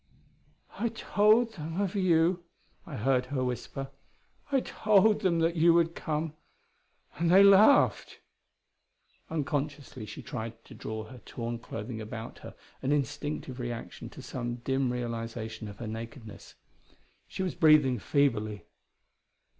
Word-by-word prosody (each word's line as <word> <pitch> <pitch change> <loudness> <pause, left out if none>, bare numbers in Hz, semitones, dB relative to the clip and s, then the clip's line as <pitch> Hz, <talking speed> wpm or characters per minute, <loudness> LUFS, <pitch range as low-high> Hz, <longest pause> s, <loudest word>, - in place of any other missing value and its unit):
"I 235 - +1
told 225 +1 +3
them 165 +1 -5
of 200 -3 0
you," 175 -2 +2 0.4
I 150 - -6
heard 125 +2 +1
her 130 -1 -1
whisper. 135 +2 -4 0.6
"I 270 -2 +3
told 215 -1 +3
them 180 -4 +2
that 165 +1 +2
you 165 +1 +5
would 165 -1 +3
come 155 -2 -3 0.9
and 170 0 +2
they 190 +3 +8
laughed." 200 +7 +5 1.1
Unconsciously 145 -5 -3
she 105 - -8
tried 115 -1 -6
to - - -13
draw 110 0 -5
her 120 +3 -12
torn 115 +1 -5
clothing 110 0 -6
about 110 +1 -7
her, - - -11 0.3
an 135 - -1
instinctive 145 -2 -2
reaction 120 -1 -6
to - - -11
some 120 -1 -4
dim 135 -1 +1
realization 115 -2 -4
of 100 -1 -9
her 120 - -6
nakedness. 115 0 -8 0.7
She 190 - -4
was 185 - -2
breathing 150 -6 +5
feebly. 110 -7 0
135 Hz, 130 wpm, -29 LUFS, 115-170 Hz, 1.1 s, they